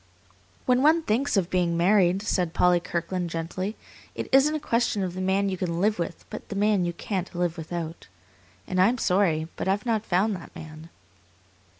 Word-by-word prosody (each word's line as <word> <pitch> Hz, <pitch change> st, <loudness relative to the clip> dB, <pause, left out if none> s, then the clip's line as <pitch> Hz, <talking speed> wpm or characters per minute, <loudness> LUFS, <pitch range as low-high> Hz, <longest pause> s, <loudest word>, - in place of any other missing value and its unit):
"When 250 Hz, 0 st, +3 dB
one 320 Hz, +3 st, +4 dB
thinks 250 Hz, 0 st, +1 dB
of 185 Hz, -3 st, 0 dB
being 175 Hz, -2 st, +1 dB
married," 185 Hz, +1 st, +3 dB
said 180 Hz, -5 st, -1 dB
Polly 180 Hz, -1 st, +4 dB
Kirkland 175 Hz, +1 st, -3 dB
gently, 175 Hz, +5 st, -4 dB, 0.4 s
"it -, -, -4 dB
isn't 275 Hz, +3 st, +5 dB
a -, -, -1 dB
question 230 Hz, -6 st, 0 dB
of 180 Hz, -2 st, -3 dB
the 185 Hz, -, -5 dB
man 190 Hz, +1 st, +1 dB
you 190 Hz, -1 st, -2 dB
can 170 Hz, -2 st, -2 dB
live 210 Hz, +2 st, +1 dB
with, 170 Hz, -, -4 dB
but -, -, -8 dB
the 200 Hz, -, -5 dB
man 205 Hz, -2 st, +2 dB
you 175 Hz, -, -2 dB
can't 185 Hz, 0 st, -4 dB
live 175 Hz, -1 st, 0 dB
without. 165 Hz, 0 st, -6 dB, 0.6 s
And 185 Hz, 0 st, +1 dB
I 185 Hz, -, +6 dB
am 245 Hz, +3 st, +1 dB
sorry, 180 Hz, -7 st, +1 dB
but -, -, -4 dB
I've 200 Hz, +3 st, 0 dB
not 225 Hz, -3 st, 0 dB
found 195 Hz, +4 st, +2 dB
that 170 Hz, -, -11 dB
man." 155 Hz, +1 st, -10 dB
185 Hz, 195 wpm, -26 LUFS, 175-210 Hz, 0.6 s, I